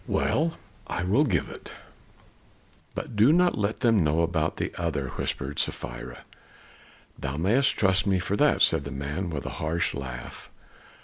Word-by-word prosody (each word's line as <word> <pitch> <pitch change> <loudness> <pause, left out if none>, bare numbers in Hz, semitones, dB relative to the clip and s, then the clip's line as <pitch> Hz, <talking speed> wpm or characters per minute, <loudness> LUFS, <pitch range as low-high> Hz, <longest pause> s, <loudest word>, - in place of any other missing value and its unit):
"Well, 160 +2 0 0.3
I 90 - -2
will 110 +12 +3
give 95 - 0
it." - - -10 1.2
"But - - -5
do 110 +7 +6
not 175 +2 +4
let 105 +1 -2
them 115 -6 +4
know 80 +2 +2
about 80 -1 0
the - - -3
other," 75 -6 -2
whispered 70 +3 -3
Sapphira. - - -3 1.0
"Thou 65 +2 -4
mayest 115 - +3
trust 95 0 +3
me 95 -1 +3
for 90 +2 -1
that!" - - +3
said - - +4
the 70 - -6
man 75 +7 -4
with 75 -4 -4
a - - -3
harsh 80 +2 0
laugh. 65 -2 -7
85 Hz, 160 wpm, -26 LUFS, 75-105 Hz, 1.2 s, do